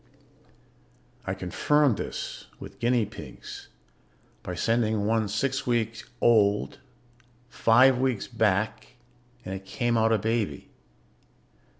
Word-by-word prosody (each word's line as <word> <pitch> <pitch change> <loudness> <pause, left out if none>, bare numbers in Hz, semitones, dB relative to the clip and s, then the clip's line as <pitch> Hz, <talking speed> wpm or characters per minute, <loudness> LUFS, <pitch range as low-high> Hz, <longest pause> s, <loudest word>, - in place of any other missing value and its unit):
"I 95 - -1
confirmed 125 +8 +2
this - - -6
with - - -11
guinea 120 -1 +2
pigs - - -10 0.7
by 90 - -6
sending 110 +1 +1
one 110 0 +1
six 135 +6 -1
weeks 115 -2 -1
old 105 -3 +3 0.7
five 125 +3 +4
weeks 130 -5 0
back 110 0 -1 0.5
and 95 - -5
it 95 0 -6
came 120 +4 0
out 110 0 +3
a 110 - +4
baby. 110 0 -2
115 Hz, 105 wpm, -27 LUFS, 105-120 Hz, 0.7 s, five